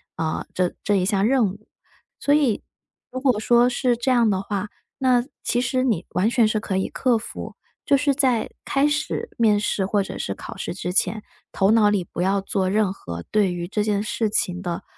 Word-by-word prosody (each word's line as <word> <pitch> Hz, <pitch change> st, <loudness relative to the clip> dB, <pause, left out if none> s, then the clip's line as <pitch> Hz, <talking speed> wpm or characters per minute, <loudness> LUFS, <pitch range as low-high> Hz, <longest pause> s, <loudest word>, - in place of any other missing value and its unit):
呃， 160 Hz, -1 st, -2 dB
这 180 Hz, -1 st, 0 dB
这 205 Hz, -, +2 dB
一 190 Hz, -, +2 dB
项 195 Hz, +1 st, +1 dB
任 240 Hz, -3 st, +3 dB
务。 210 Hz, +3 st, -14 dB, 0.5 s
所 285 Hz, -, +2 dB
以 285 Hz, -7 st, +2 dB, 0.5 s
如 255 Hz, -, -4 dB
果 255 Hz, -5 st, +2 dB
说 240 Hz, +2 st, +4 dB
是 245 Hz, -1 st, +1 dB
这 240 Hz, +3 st, -1 dB
样 240 Hz, -3 st, +4 dB
的 190 Hz, -2 st, 0 dB
话， 200 Hz, 0 st, -3 dB, 0.3 s
那 250 Hz, -2 st, +3 dB, 0.2 s
其 240 Hz, -, 0 dB
实 255 Hz, +1 st, 0 dB
你 220 Hz, -10 st, 0 dB
完 200 Hz, +5 st, +2 dB
全 235 Hz, -2 st, +3 dB
是 215 Hz, 0 st, 0 dB
可 195 Hz, -3 st, -2 dB
以 190 Hz, -, 0 dB
克 250 Hz, -3 st, +1 dB
服。 220 Hz, -, -7 dB, 0.3 s
就 280 Hz, -, +4 dB
是 285 Hz, 0 st, +2 dB
在 255 Hz, -5 st, +1 dB, 0.2 s
开 275 Hz, +1 st, +2 dB
始 305 Hz, +10 st, -2 dB
面 220 Hz, -3 st, +4 dB
试， 205 Hz, -2 st, 0 dB
或 200 Hz, +1 st, +1 dB
者 -, -, -7 dB
是 95 Hz, -, -2 dB
考 -, -, -9 dB
试 -, -, -4 dB
之 180 Hz, 0 st, -4 dB
前， 215 Hz, +2 st, 0 dB, 0.3 s
头 195 Hz, +1 st, +3 dB
脑 220 Hz, -2 st, +5 dB
里 205 Hz, -3 st, +1 dB
不 170 Hz, -, -5 dB
要 195 Hz, +2 st, +1 dB
做 190 Hz, -1 st, -1 dB
任 205 Hz, -1 st, +2 dB
何 85 Hz, -, -7 dB
对 200 Hz, -4 st, +2 dB
于 175 Hz, -1 st, -4 dB
这 210 Hz, +3 st, -1 dB
件 205 Hz, -1 st, 0 dB
事 215 Hz, 0 st, -1 dB
情 180 Hz, -3 st, -1 dB
的 175 Hz, -3 st, -4 dB
215 Hz, 230 characters per minute, -23 LUFS, 190-245 Hz, 0.5 s, 脑